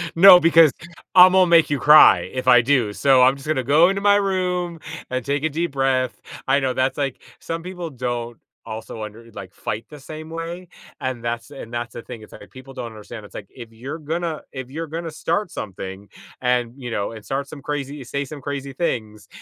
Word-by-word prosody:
"No, 180 Hz, +1 st, +9 dB
because 165 Hz, -3 st, +6 dB, 0.5 s
Imma 185 Hz, +1 st, +8 dB
make 170 Hz, -2 st, +5 dB
you 145 Hz, -2 st, 0 dB
cry, 150 Hz, +1 st, +8 dB
if 130 Hz, 0 st, -4 dB
I 125 Hz, -2 st, +7 dB
do, 120 Hz, -5 st, +1 dB
so, 135 Hz, +1 st, +4 dB
I'm 130 Hz, +2 st, +5 dB
just 135 Hz, +1 st, -12 dB
gonna 145 Hz, -5 st, 0 dB
go 155 Hz, +7 st, +5 dB
into 195 Hz, 0 st, -2 dB
my 205 Hz, 0 st, +5 dB
room, 180 Hz, -4 st, -1 dB, 0.3 s
and 130 Hz, -1 st, -3 dB
take 140 Hz, +1 st, -1 dB
a 160 Hz, -, +1 dB
deep 165 Hz, +2 st, -2 dB
breath." 130 Hz, -2 st, 0 dB, 0.3 s
I 140 Hz, +2 st, +3 dB
know, 130 Hz, -2 st, -1 dB
that's, 130 Hz, +1 st, 0 dB
like 140 Hz, -2 st, -3 dB, 0.2 s
some 165 Hz, 0 st, -5 dB
people 180 Hz, -2 st, -6 dB
don't 120 Hz, -3 st, -4 dB, 0.3 s
also 110 Hz, 0 st, -7 dB
under 115 Hz, +2 st, -10 dB
like, 95 Hz, -1 st, -10 dB
fight 105 Hz, +2 st, -5 dB
the 150 Hz, -1 st, -11 dB
same 155 Hz, +3 st, -9 dB
way, 170 Hz, +2 st, -7 dB, 0.3 s
and 130 Hz, -2 st, -3 dB
that's 120 Hz, +3 st, -4 dB
and 120 Hz, -4 st, -10 dB
that's 120 Hz, -1 st, -4 dB
the 120 Hz, -, -7 dB
thing, 115 Hz, -2 st, -10 dB
it's, 110 Hz, -, -14 dB
like, 100 Hz, -, -13 dB
people 130 Hz, +1 st, -13 dB
don't 125 Hz, -2 st, -6 dB
understand, 110 Hz, 0 st, -10 dB
it's, -, -, -16 dB
like, 100 Hz, -, -8 dB
if 115 Hz, -3 st, -12 dB
you're 135 Hz, +8 st, -7 dB
gonna 160 Hz, +1 st, -3 dB
if 130 Hz, -1 st, -7 dB
you're 165 Hz, +2 st, -5 dB
gonna 165 Hz, +1 st, -5 dB
start 170 Hz, +5 st, -2 dB
something, 95 Hz, 0 st, -7 dB, 0.3 s
and, 125 Hz, -1 st, 0 dB
you 125 Hz, -2 st, -7 dB
know 100 Hz, -1 st, -2 dB
and 110 Hz, -2 st, -11 dB
start 140 Hz, +1 st, -3 dB
some 145 Hz, -, -10 dB
crazy 145 Hz, -1 st, -5 dB
say 140 Hz, +3 st, -3 dB
some 145 Hz, +1 st, -9 dB
crazy 140 Hz, 0 st, -5 dB
things, 110 Hz, -9 st, -3 dB
135 Hz, 210 wpm, -21 LUFS, 120-160 Hz, 0.5 s, No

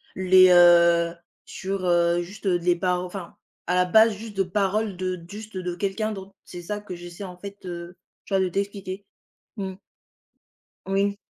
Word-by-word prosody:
les, 185 Hz, 0 st, +6 dB
heu, 170 Hz, -1 st, +6 dB, 0.3 s
sur, 190 Hz, 0 st, -4 dB
heu 175 Hz, 0 st, +3 dB
juste, 195 Hz, +5 st, -10 dB
heu, 180 Hz, -2 st, +2 dB
de -, -, -12 dB
les 175 Hz, -1 st, +4 dB
par 180 Hz, 0 st, 0 dB
enfin 180 Hz, -1 st, -8 dB, 0.3 s
à 180 Hz, -, -1 dB
la 180 Hz, 0 st, +3 dB
base, 220 Hz, +4 st, +5 dB
juste 210 Hz, 0 st, -9 dB
de 195 Hz, -, +3 dB
paroles 200 Hz, +2 st, -1 dB
de 185 Hz, 0 st, -2 dB
d 170 Hz, -2 st, -13 dB
juste 210 Hz, -1 st, -8 dB
de 180 Hz, -1 st, -3 dB
quelqu'un 200 Hz, +4 st, -2 dB
d'autre. 195 Hz, -1 st, -8 dB
C'est 175 Hz, -, -9 dB
ça 205 Hz, +4 st, -4 dB
que 205 Hz, -3 st, -9 dB
j'essaie 175 Hz, +2 st, -9 dB
en 180 Hz, -2 st, -8 dB
fait, 200 Hz, +2 st, -9 dB
heu, 175 Hz, 0 st, -7 dB, 0.3 s
tu -, -, -7 dB
vois, -, -, +3 dB
de 185 Hz, -, +1 dB
t'expliquer. 195 Hz, 0 st, -4 dB, 0.5 s
Mmh. 190 Hz, -2 st, -4 dB, 1.1 s
Oui. 200 Hz, +1 st, 0 dB
185 Hz, 185 wpm, -24 LUFS, 175-200 Hz, 1.1 s, les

